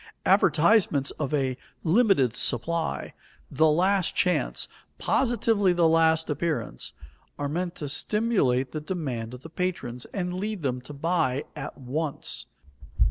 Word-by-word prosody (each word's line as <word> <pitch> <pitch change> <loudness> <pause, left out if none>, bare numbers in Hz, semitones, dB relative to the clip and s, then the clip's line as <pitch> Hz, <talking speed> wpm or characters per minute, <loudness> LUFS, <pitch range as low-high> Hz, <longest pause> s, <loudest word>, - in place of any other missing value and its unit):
Advertisements 170 -4 +4
of 140 - -1
"a 135 -4 0 0.3
limited 170 - +3
supply," 160 +7 0 0.4
"the 155 +3 +4
last 185 +4 +2
chance," 180 0 +1 0.3
"positively 225 -6 +2
the 170 -1 +4
last 160 0 +3
appearance," 150 - -3 0.4
are 145 - -2
meant 175 +4 -2
to 150 - -5
stimulate 140 - +1
the 155 - -4
demand 130 -9 -4
of 125 - -13
the - - -7
patrons, 155 -9 -3
and 180 -2 -2
to 180 - -4
lead 205 -2 -3
them 125 -2 -1
to 130 +4 -10
buy 155 -3 0
at - - -6
once. 140 +3 -3
160 Hz, 135 wpm, -26 LUFS, 135-180 Hz, 0.4 s, Advertisements